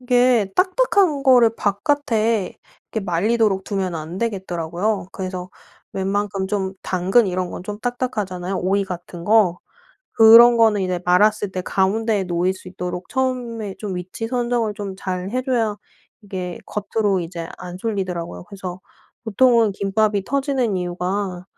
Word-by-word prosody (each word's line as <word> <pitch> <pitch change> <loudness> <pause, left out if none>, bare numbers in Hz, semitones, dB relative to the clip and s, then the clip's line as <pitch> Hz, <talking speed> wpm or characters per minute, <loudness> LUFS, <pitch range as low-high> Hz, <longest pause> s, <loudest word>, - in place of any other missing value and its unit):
이게 245 -4 +3
딱딱한 370 - +2
거를 250 -4 +6
바깥에 225 -2 0 0.3
이렇게 220 -3 -2
말리도록 195 +2 +1
두면 190 -4 -2
안 160 +3 -6
되겠더라고요. 190 -2 -2
그래서 185 -1 -5 0.4
웬만큼 195 0 -1
좀 195 -2 -1
당근 190 +5 +2
이런 185 -1 -2
건 - - -7
좀 210 +2 -6
딱딱하잖아요 205 -7 -3
오이 195 +2 +1
같은 175 -2 -8
거. 205 -4 +4 0.5
그런 230 +2 +8
거는 220 -3 +4
이제 185 -1 -1
말았을 205 +2 +3
때 185 - -2
가운데에 205 +2 +1
놓일 180 +1 0
수 185 -1 -12
있도록 180 0 -6
처음에 240 -6 -2
좀 205 -3 -4
위치 185 +5 -5
선정을 240 -3 0
좀 200 -2 -6
잘 185 0 -4
해 255 +2 -1
줘야 230 -5 0 0.5
이게 185 -3 -5
겉으로 205 -2 -1
이제 165 -1 -6
안 180 0 -7
쏠리더라고요. 180 - -4
그래서 185 -2 -8 0.4
보통은 230 -1 +3
김밥이 200 0 0
터지는 270 -6 0
이유가 180 +1 -3
200 Hz, 315 characters per minute, -21 LUFS, 185-230 Hz, 0.5 s, 그런